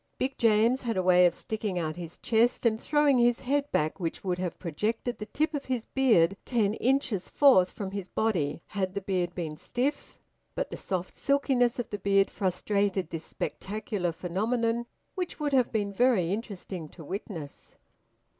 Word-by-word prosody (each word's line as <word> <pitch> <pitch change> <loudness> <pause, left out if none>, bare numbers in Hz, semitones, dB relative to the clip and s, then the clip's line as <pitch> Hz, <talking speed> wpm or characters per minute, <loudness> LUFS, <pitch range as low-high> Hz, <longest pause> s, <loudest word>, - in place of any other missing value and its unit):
Big 265 +1 -1
James 230 +3 +4
had 230 -5 -2
a 185 - +1
way 180 0 +6
of 170 - -2
sticking 215 -4 -3
out 155 -2 -2
his 175 -1 -7
chest 235 +2 +2
and 220 -1 +2
throwing 295 -3 +3
his 240 0 +3
head 285 +2 0
back 155 +5 0
which 165 -3 -3
would 180 -2 -1
have 180 -2 -3
projected 215 +8 -2
the 210 - -6
tip 310 +5 0
of 285 -2 -3
his 250 -3 -2
beard 205 -10 +3
ten 215 -5 +1
inches 240 -5 0
forth 250 -11 +5
from 195 -2 -6
his 195 -2 -4
body, 170 -9 -1
had 190 -2 -2
the 200 - -1
beard 180 -2 -1
been 160 -4 -4
stiff; 250 - -3 0.4
but - - -2
the - - -4
soft 185 -1 -3
silkiness 265 -4 +2
of 245 - -4
the 205 - -3
beard 195 0 +3
frustrated 195 -1 0
this 165 -1 -5
spectacular 205 -3 -3
phenomenon, 230 +7 -1 0.3
which 360 -4 -4
would 295 -2 -1
have 255 -3 +3
been 205 -3 -1
very 200 -6 +3
interesting 195 -6 -6
to 165 - -12
witness. 175 -5 -7
205 Hz, 175 wpm, -28 LUFS, 180-245 Hz, 0.4 s, way